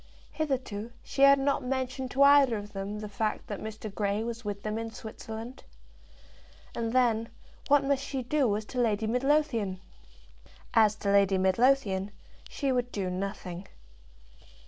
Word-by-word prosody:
Hitherto 255 -8 -3
she 275 - -4
had 275 0 +8
not 275 +1 +1
mentioned 260 0 -2
to 275 +2 +3
either 280 -4 +6
of 205 0 -8
them 200 +2 -5
the 210 - -5
fact 215 +1 -2
that 205 - -6
Mr. 215 -1 -7
Grey 205 +1 -1
was 235 +1 -5
with 205 -1 -5
them 215 +1 -2
in 225 0 -4
Switzerland. 225 +2 -8 1.1
And, 230 -1 -2
then, 230 -2 +2 0.4
what 285 0 +5
must 275 0 0
she 270 -2 -4
do 250 -5 +1
as 215 - -6
to 250 - -2
Lady 220 -2 +1
Midlothian? 245 -5 +1 0.9
As 215 -2 +5
to 200 -2 -1
Lady 200 -1 +4
Midlothian, 195 0 +2 0.4
she 275 -2 -1
would 245 -1 -1
do 190 -3 -2
nothing. 185 -1 -5
225 Hz, 150 wpm, -29 LUFS, 205-260 Hz, 1.1 s, had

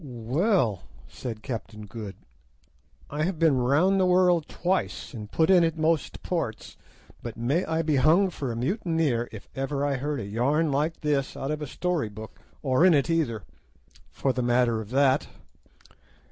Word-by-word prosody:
"Well," 125 - 0 0.3
said 110 -4 -7
Captain 110 -4 -6
Good, 105 -2 -7 1.0
"I 150 +2 -3
have 175 +2 0
been 155 -4 +3
round 155 +10 +3
the 185 - +4
world 180 -3 +3
twice, 185 -4 -2
and 105 -4 -8
put 160 +3 +3
in 180 -2 +6
at 165 -1 0
most 160 -1 0
ports, 160 -12 -3 0.5
but 120 -1 -7
may 135 +10 +1
I 160 0 0
be 150 -2 +1
hung 170 +8 +4
for 135 -6 -4
a - - -4
mutineer 150 - 0
if 110 -3 -10
ever 140 +1 -1
I 140 -2 0
heard 145 +2 -2
a 105 - -4
yarn 140 +9 +1
like 150 +4 -1
this 145 -3 -1
out 135 - -3
of 150 0 -3
a 150 - -4
story 175 -6 -1
book, 110 +1 -10 0.2
or 130 +2 +3
in 180 -3 +6
it 145 +4 +1
either, 120 - 0 0.7
for 135 - -1
the 125 - -1
matter 120 -2 +2
of 105 - -9
that." 135 +2 +3
140 Hz, 175 wpm, -26 LUFS, 120-165 Hz, 1.0 s, in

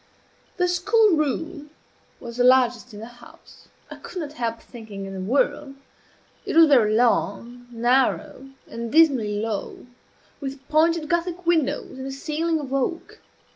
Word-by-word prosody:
The 360 -1 +2
school 415 +5 +3
room 305 +1 -3 0.5
was 235 -1 -9
the 245 - +2
largest 250 -1 +3
in 205 - -10
the - - -7 0.2
house 235 - -17 0.2
I - - -8
could 370 - -8
not 300 -3 -6
help 230 -4 -3
thinking, 220 -5 -10
in 195 - -8
the 190 - -6
world. 275 +6 -1 0.7
It - - -4
was 330 0 +8
very 220 -6 +4
long, 240 +1 0
narrow, 250 +2 0 0.2
and 230 0 -6
dismally 260 -11 +3
low, 215 -2 -5 0.5
with 275 -1 -7
pointed 315 +1 +2
Gothic 345 +1 -2
windows 320 -5 0
and 265 - -6
a - - -5
ceiling 315 +3 -2
of 275 -2 -6
oak. 275 +5 -3
270 Hz, 150 wpm, -23 LUFS, 235-320 Hz, 0.7 s, was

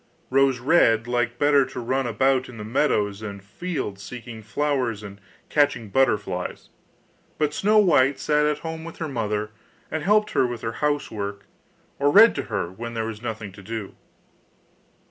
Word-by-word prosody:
Rose 135 -1 +4
red 120 -5 +3
liked 120 0 -1
better 145 0 +4
to 130 -1 -6
run 130 +2 -1
about 130 +2 +1
in 120 - -10
the 105 - -6
meadows 105 -4 0
and 100 -2 -7
fields 105 - -5
seeking 120 -1 -8
flowers 125 -2 -1
and 100 -1 -10 0.3
catching 145 -7 +1
butterflies; 100 -7 0 0.7
but 150 -1 0
Snow 210 +6 +3
white 140 -9 +4
sat 150 +2 +2
at 150 -1 0
home 160 0 -5
with 165 0 -9
her 160 - -3
mother, 105 -5 -2 0.4
and 160 - -2
helped 210 +5 +3
her 125 - +2
with 120 -2 -6
her 115 - -2
housework, 105 -9 -2 0.5
or 140 +1 +3
read 220 +9 +8
to - - -3
her 100 -6 -3
when 115 +4 -7
there 110 -1 -1
was 110 -1 -6
nothing 110 -3 -5
to 100 - -13
do. 110 0 -6
120 Hz, 165 wpm, -24 LUFS, 105-145 Hz, 0.7 s, read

